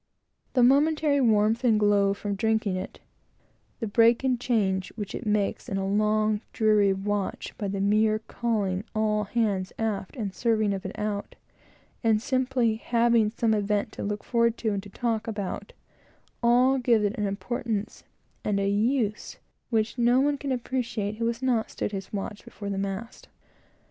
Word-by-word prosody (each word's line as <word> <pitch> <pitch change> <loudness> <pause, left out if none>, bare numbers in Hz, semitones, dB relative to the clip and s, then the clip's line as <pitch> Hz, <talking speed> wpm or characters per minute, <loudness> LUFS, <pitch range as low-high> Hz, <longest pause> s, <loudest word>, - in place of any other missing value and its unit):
The 250 - +4
momentary 290 +2 +4
warmth 220 0 +3
and 225 -4 +4
glow 200 -1 +3
from 205 0 -3
drinking 220 -1 0
it; 185 - -6 0.8
the 230 - -2
break 230 +3 +4
and 255 -2 +1
change 195 -6 0
which 205 -3 -5
is 235 - -5
made 210 -1 +1
in 195 - -2
a 195 0 -1
long, 215 +1 +1
dreary 210 -2 +3
watch 200 +1 -3
by 205 - -4
the 195 0 -3
mere 215 +2 +3
calling 215 -4 -2
all 210 -1 +1
hands 200 -4 -1
aft 210 -4 -3
and 210 -7 -4
serving 220 -3 +1
of 190 -1 -4
it 190 - -9
out; 210 -1 -3 0.7
and 225 -2 +4
the 215 - -7
simply 255 -4 +1
having 235 -1 +2
some 225 0 0
event 210 +1 0
to - - -8
look 205 0 -3
forward 235 -1 +1
to, 225 - -1
and 200 - -2
to 200 - -12
talk 230 +2 -2
about; 210 - -4 1.1
give 230 -4 +3
it 205 - -1
an 210 -1 -1
importance 215 +1 -3 0.4
and 205 -1 0
a 200 - 0
use 210 +1 0 0.3
which 225 +1 0
no 240 +2 +4
one 290 +2 +2
can 275 0 -3
appreciate 240 -4 -2
who 230 0 0
has 235 +2 -3
not 240 -4 +1
stood - - -3
his 195 -1 -6
watch 205 +1 -5
before 200 -1 -7
the 195 - -2
mast. 195 +4 -5
215 Hz, 170 wpm, -26 LUFS, 200-235 Hz, 1.1 s, The